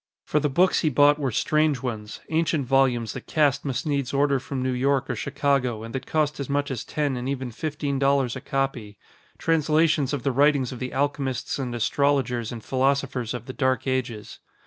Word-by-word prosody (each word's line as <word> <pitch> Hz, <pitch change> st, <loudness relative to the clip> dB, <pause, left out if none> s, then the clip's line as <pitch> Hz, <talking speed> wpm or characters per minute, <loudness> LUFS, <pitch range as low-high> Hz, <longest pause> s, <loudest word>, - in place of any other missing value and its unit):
For 150 Hz, -, +1 dB
the 150 Hz, 0 st, 0 dB
books 180 Hz, +7 st, +3 dB
he 155 Hz, -, +2 dB
bought 145 Hz, +2 st, +4 dB
were 140 Hz, -3 st, 0 dB
strange 150 Hz, +2 st, +1 dB
ones; 110 Hz, -4 st, -5 dB
ancient 160 Hz, -3 st, +1 dB
volumes 125 Hz, -4 st, +2 dB
that -, -, -8 dB
Cass 145 Hz, -3 st, +2 dB
must 135 Hz, 0 st, -3 dB
needs 140 Hz, -3 st, -1 dB
order 140 Hz, -1 st, +3 dB
from 130 Hz, 0 st, -4 dB
New 130 Hz, -, 0 dB
York 135 Hz, +2 st, +1 dB
or -, -, -2 dB
Chicago 140 Hz, -5 st, 0 dB
and 115 Hz, -, -8 dB
that 135 Hz, 0 st, -5 dB
cost 150 Hz, -2 st, 0 dB
as 140 Hz, -, -4 dB
much 140 Hz, 0 st, 0 dB
as 125 Hz, -4 st, -3 dB
ten 145 Hz, -3 st, -1 dB
and 125 Hz, +1 st, -3 dB
even 130 Hz, -3 st, -3 dB
fifteen 145 Hz, +1 st, -3 dB
dollars 135 Hz, -3 st, +2 dB
a 130 Hz, -, -6 dB
copy; 135 Hz, -8 st, -3 dB, 0.4 s
translations 155 Hz, -3 st, +2 dB
of 140 Hz, -5 st, -3 dB
the 140 Hz, -, +1 dB
writings 140 Hz, -1 st, +3 dB
of 125 Hz, -, -7 dB
the 130 Hz, 0 st, -4 dB
alchemists 140 Hz, -1 st, -1 dB
and 125 Hz, -3 st, -3 dB
astrologers 125 Hz, -1 st, +1 dB
and 115 Hz, -2 st, -7 dB
philosophers 130 Hz, -3 st, 0 dB
of 120 Hz, -1 st, -7 dB
the 130 Hz, -, -7 dB
dark 130 Hz, -3 st, 0 dB
ages. 125 Hz, -5 st, -3 dB
135 Hz, 195 wpm, -25 LUFS, 125-145 Hz, 0.4 s, bought